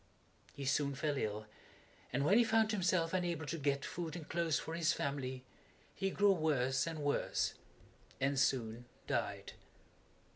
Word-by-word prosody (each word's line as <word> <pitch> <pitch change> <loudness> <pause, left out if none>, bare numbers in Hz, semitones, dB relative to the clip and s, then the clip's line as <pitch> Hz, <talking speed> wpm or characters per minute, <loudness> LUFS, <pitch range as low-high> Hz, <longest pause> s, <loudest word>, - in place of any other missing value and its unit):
He 140 - -5
soon 140 +1 +1
fell 145 +1 0
ill, 110 -4 -2 0.7
and 135 +3 +1
when 200 +9 +6
he - - +7
found 225 -1 +3
himself 180 -4 +1
unable 175 -4 -1
to 165 - -3
get 140 -1 0
food 165 -3 -4
and 165 -4 -7
clothes 165 -4 +1
for 160 - -5
his 170 0 +2
family, 130 -2 -3 0.5
he 195 -1 -1
grew 205 +1 +4
worse 140 -6 +1
and 165 -1 -3
worse 145 0 0 0.7
and 135 0 +1
soon 120 -3 +1 0.2
died. - - -2
150 Hz, 150 wpm, -36 LUFS, 135-170 Hz, 0.7 s, he